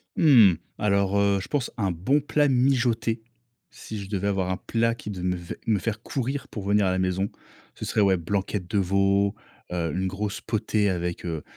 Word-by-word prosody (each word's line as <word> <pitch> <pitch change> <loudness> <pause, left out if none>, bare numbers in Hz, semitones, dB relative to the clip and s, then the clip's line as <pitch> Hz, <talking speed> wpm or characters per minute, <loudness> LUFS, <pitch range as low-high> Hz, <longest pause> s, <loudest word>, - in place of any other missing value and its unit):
Mmh. 120 - +7 0.2
Alors, 100 -1 +1
heu, 100 -1 +3
je - - -7
pense 145 -5 -1
un 100 -4 0
bon 95 - +1
plat 145 0 +2
mijoté 125 -3 +2 0.5
si 110 - -8
je 100 -1 -8
devais 100 -1 -1
avoir 95 -2 0
un 95 - -1
plat 115 +2 0
qui 105 - -7
devait 90 -2 -4
me 110 -2 +3
faire 110 +3 -3
courir 135 +3 -3
pour 105 - -7
venir 100 0 +3
à - - +2
la 95 - 0
maison, 95 +1 0 0.5
ce - - -6
serait, 110 - +1
ouais, 95 -2 +4
blanquette 95 +1 -2
de 105 - +1
veau, 100 +2 +2 0.4
heu, 85 -2 -1
une 95 +1 -1
grosse 100 +2 -3
potée 105 -1 0
avec, 90 -2 -2
heu, 80 -3 -3
100 Hz, 190 wpm, -25 LUFS, 95-115 Hz, 0.5 s, Mmh